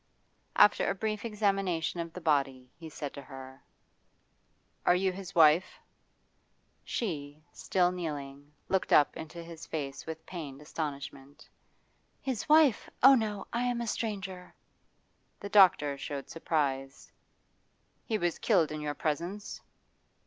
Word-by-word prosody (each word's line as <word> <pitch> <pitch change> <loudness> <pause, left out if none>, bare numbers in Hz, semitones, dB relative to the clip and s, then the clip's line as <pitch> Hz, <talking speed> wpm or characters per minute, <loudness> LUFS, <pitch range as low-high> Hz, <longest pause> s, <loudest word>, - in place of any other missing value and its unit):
After 210 - +5
a 195 - -1
brief 215 +1 -3
examination 195 -6 0
of 170 0 -4
the 180 - -8
body 135 -5 0
he 165 -1 -10
said 145 -2 -6
to 140 - -8
her: 130 -1 -11 1.2
'You 185 +2 +4
are - - -10
his 195 0 -9
wife?' 160 +2 +5 1.1
She, 150 -8 -4
still 180 -1 +1
kneeling, 145 -5 -6 0.2
looked 190 -1 0
up 145 - +5
into 165 +1 -8
his 165 -1 -10
face 140 -3 -5
with 160 0 -7
pained 150 -7 -7
astonishment. 145 -1 -7 0.7
'His 260 0 -4
wife? 305 -6 +5
Oh 270 +1 +10
no! 215 -5 0
I 235 - 0
am 245 -1 0
a 235 - -2
stranger.' 195 -5 -4 0.8
The 200 - -7
doctor 180 -9 +5
showed 140 0 -6
surprise. 135 -5 -2 0.9
'He 220 - -1
was 175 -4 -1
killed 180 -9 +2
in 155 0 -5
your 145 -1 -3
presence? 170 +8 -3
165 Hz, 130 wpm, -30 LUFS, 145-195 Hz, 1.2 s, Oh